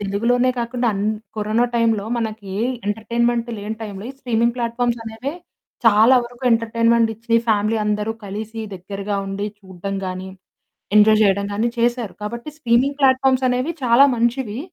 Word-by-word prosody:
తెలుగులోనే 235 +6 +1
కాకుండా 240 +1 -1
అన్ 200 0 -2 0.3
కరోనా 215 +3 +1
టైంలో 225 -3 +2
మనకి 215 -4 -4 0.3
ఎంటర్‌టైన్‌మెంట్ 235 +2 0
లేని 210 +2 -5
టైంలో 205 -2 -7
ఈ - - -9
స్ట్రీమింగ్ 235 -2 +1
ప్లాట్ఫామ్స్ 240 0 -1
అనేవే 225 +5 -5 0.5
చాలా 225 +3 +6
వరకు 240 +1 -13
ఎంటర్‌టైన్‌మెంట్ 230 0 +2
ఇచ్చి 230 +1 -2
ఫ్యామిలీ 215 +1 +2
అందరు 210 +1 -1
కలిసి 215 +3 -6
దగ్గరగా 195 +2 -4
ఉండి 195 +1 -3
చూడడం 190 0 -7
గానీ, 185 +1 -5 0.7
ఎంజాయ్ 215 +1 +6
చేయడం 200 -1 +2
గానీ 220 +4 0
చేశారు. 240 -2 0
కాబట్టి 235 +6 -5
స్ట్రీమింగ్ 270 +1 +2
ప్లాట్ఫామ్స్ 260 -1 +3
అనేవి 250 +6 0
చాలా 245 +3 +6
మంచివి. 235 -1 -1
225 Hz, 140 wpm, -21 LUFS, 210-240 Hz, 0.7 s, చాలా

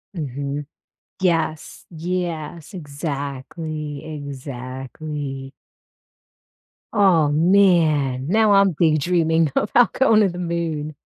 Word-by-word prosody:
Mhm. 145 -1 -4 0.6
Yes, 165 -4 -1
yes, 170 0 -4
exactly, 145 -1 -5
exactly. 135 0 -6 1.4
Aw, 185 -7 +4
man. 155 -6 +3
Now 215 +4 +3
I'm 195 -1 +5
big 155 -1 +2
dreaming 165 -2 +2
about 235 +4 +3
going 225 -5 +4
to 200 - +3
the 175 - -7
Moon. 165 -3 -3
155 Hz, 85 wpm, -21 LUFS, 145-175 Hz, 1.4 s, I'm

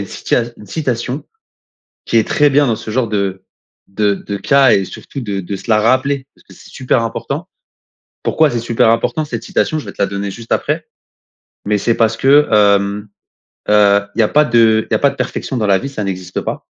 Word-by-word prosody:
une - - -7
cita 120 - -1
une 105 - -14
citation 130 +2 -3 0.8
qui - - -1
est 110 - +3
très 145 0 +3
bien 145 +1 +3
dans 115 -3 0
ce 110 - -8
genre 120 0 0
de 95 -3 -2 0.4
de 100 +1 0
de 100 +1 -6
cas 135 +3 +4
et 95 - +2
surtout 135 - -9
de 100 -4 -3
de 100 +2 -5
se 95 - -13
la 110 - +4
rappeler 130 +4 +1
parce - - -26
que - - -16
c'est - - -16
super 130 -2 0
important. 140 +9 -4 0.8
Pourquoi 155 -2 +2
c'est 120 - -1
super 115 -1 +2
important, 135 +7 0
cette 150 - -5
citation? 155 - -1
Je - - -9
vais - - -8
te - - -6
la 100 - +2
donner 100 0 -4
juste 115 +3 -11
après, - - -1 0.8
mais 105 0 +1
c'est 115 +3 0
parce 110 -1 +2
que 145 +4 +4
hem, 100 0 +2 0.6
heu, 100 -1 +4
il - - -8
y - - +6
a 105 - +2
pas 150 +1 +4
de 115 -3 +3
il - - -4
y - - +4
a - - +2
pas 140 - +3
de 140 - -11
perfection 130 +1 -3
dans 105 - 0
la 100 -1 +3
vie, 140 - -5
ça 120 -6 -5
n'existe 95 -2 -4
pas. - - -5
115 Hz, 225 wpm, -16 LUFS, 100-135 Hz, 0.8 s, y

